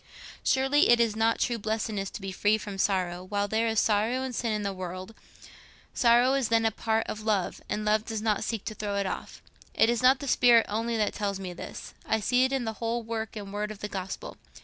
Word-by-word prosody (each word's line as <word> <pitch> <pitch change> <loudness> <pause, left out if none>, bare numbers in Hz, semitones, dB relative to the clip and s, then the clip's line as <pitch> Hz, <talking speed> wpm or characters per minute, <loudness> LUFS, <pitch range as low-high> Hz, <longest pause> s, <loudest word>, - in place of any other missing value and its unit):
Surely 270 +2 +3
it 240 0 +6
is 230 -2 +2
not 225 +1 +2
true 235 -1 0
blessedness 215 -2 -2
to - - -8
be 195 0 -4
free 205 +3 +2
from 205 -2 -7
sorrow, 180 -3 0
while 205 +2 -1
there 220 +2 +1
is 225 -1 +2
sorrow 225 +5 +1
and 260 -1 -4
sin 235 -1 -1
in 210 -1 -1
the 200 -1 -2
world: 185 +2 -7 0.8
sorrow 240 +1 +4
is 270 -4 +1
then 225 0 +3
a 225 - +3
part 220 +1 0
of 215 - -5
love, 210 -4 -1
and 210 0 -2
love 215 0 +2
does 225 -1 -4
not 215 -1 0
seek 220 -2 -3
to 215 - -4
throw 205 -1 -4
it 200 0 0
off. - - -6 0.3
It 225 - +4
is 240 - -1
not 255 +2 +6
the 280 - -7
spirit 240 -3 +5
only 225 +2 -1
that 210 -1 0
tells 200 -2 -2
me 185 -2 -5
this—I 220 +4 -5
see 250 +4 +3
it 260 - -1
in 265 -3 -1
the 220 - -2
whole 230 +1 -1
work 225 0 -4
and 200 -2 -7
word 210 0 -2
of 215 - -7
the 210 - -3
Gospel. 190 -1 -6
220 Hz, 235 wpm, -28 LUFS, 205-235 Hz, 0.8 s, it